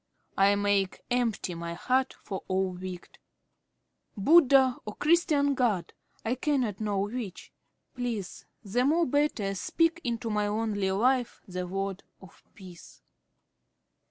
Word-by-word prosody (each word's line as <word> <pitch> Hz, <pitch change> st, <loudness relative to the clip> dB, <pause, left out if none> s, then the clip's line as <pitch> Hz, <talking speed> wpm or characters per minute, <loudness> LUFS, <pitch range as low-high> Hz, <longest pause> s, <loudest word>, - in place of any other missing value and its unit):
"I 200 Hz, +1 st, +4 dB
make 200 Hz, -2 st, 0 dB
empty 235 Hz, -7 st, 0 dB
my 170 Hz, 0 st, -5 dB
heart 255 Hz, +8 st, 0 dB
of 195 Hz, -2 st, -4 dB
all 190 Hz, 0 st, 0 dB
wicked. 180 Hz, 0 st, -8 dB, 1.0 s
Buddha 265 Hz, -, +5 dB
or 210 Hz, -, -7 dB
Christians' 300 Hz, -3 st, +3 dB
God, 230 Hz, -9 st, 0 dB, 0.3 s
I 225 Hz, -, 0 dB
no -, -, +2 dB
can 255 Hz, -7 st, 0 dB
know 210 Hz, -2 st, -1 dB
which. 205 Hz, -2 st, -5 dB, 0.4 s
Please 235 Hz, -6 st, -4 dB, 0.2 s
the 230 Hz, +5 st, 0 dB
more 325 Hz, +5 st, +3 dB
better 285 Hz, -9 st, 0 dB
speak 330 Hz, -, 0 dB
into 230 Hz, -3 st, -2 dB
my 210 Hz, 0 st, +1 dB
lonely 205 Hz, -2 st, -1 dB
life 245 Hz, +5 st, +1 dB
the 180 Hz, -1 st, -4 dB
word 195 Hz, +1 st, -3 dB, 0.2 s
of 190 Hz, -3 st, -16 dB
peace." 180 Hz, -3 st, -14 dB
215 Hz, 130 wpm, -28 LUFS, 195-255 Hz, 1.0 s, Buddha